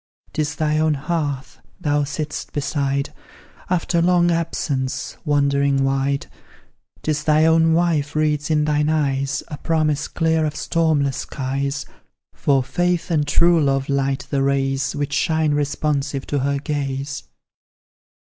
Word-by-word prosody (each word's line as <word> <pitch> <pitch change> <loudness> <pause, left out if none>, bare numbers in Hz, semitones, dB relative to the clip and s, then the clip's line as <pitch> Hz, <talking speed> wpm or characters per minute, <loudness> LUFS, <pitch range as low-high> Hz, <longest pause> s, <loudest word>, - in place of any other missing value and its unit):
'Tis 155 0 -1
thy 155 0 +1
own 155 -1 +2
hearth 145 -3 -3 0.2
thou 145 0 +1
sitt'st 150 +1 -4
beside, 140 -1 -1 0.6
After 175 -1 +1
long 175 0 +4
absence 145 -5 -2
wandering 140 -2 +2
wide; 135 +1 0 0.8
'Tis 150 -1 -1
thy 155 0 +4
own 160 0 +4
wife 160 -3 +1
reads 150 -1 +1
in 150 -1 +2
thine 150 0 +1
eyes 140 -3 0
A 150 - -6
promise 155 -2 0
clear 160 -1 +1
of 150 -1 -1
stormless 155 -6 +1
skies; 140 +1 -3 0.5
For 135 -2 +2
faith 175 +5 0
and 150 -3 +1
true 170 +1 +4
love 135 -1 0
light 135 0 0
the 140 -2 +1
rays 135 0 0
Which 145 -1 -2
shine 160 -1 +1
responsive 145 -1 -1
to 145 - -1
her 140 +1 0
gaze. 140 -1 -3
145 Hz, 130 wpm, -21 LUFS, 140-155 Hz, 0.8 s, long